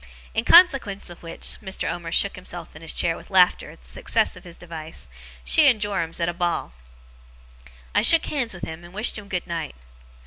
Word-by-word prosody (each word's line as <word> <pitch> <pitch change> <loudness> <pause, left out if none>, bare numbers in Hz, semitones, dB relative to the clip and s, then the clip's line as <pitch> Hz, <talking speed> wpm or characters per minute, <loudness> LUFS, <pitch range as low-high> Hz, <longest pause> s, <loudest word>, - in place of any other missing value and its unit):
In 225 - -1
consequence 270 - +4
of 175 - -13
which,' 165 -1 -6
Mr. 190 -2 -3
Omer 170 -1 -5
shook 200 +3 +1
himself 175 -2 -6
and 160 - -13
his 165 - -5
chair 165 -1 +1
with - - -13
laughter 185 -2 +3
at 60 - -16
the 60 - -19
success - - 0
of - - -13
his 170 -1 -12
device, 160 - -9 0.4
'she 300 - +5
and 245 -5 +4
Joram's 200 -6 -2
at 170 - 0
a 175 - -1
ball.' 170 - -2 1.2
I - - +3
shook 330 -1 +7
hands 260 -6 -1
with 175 - -12
him, 160 +1 -7
and 175 +2 -14
wished 215 +1 +2
him 205 - -13
good 180 -3 -3
night. 165 -4 -5
175 Hz, 205 wpm, -23 LUFS, 165-205 Hz, 1.2 s, shook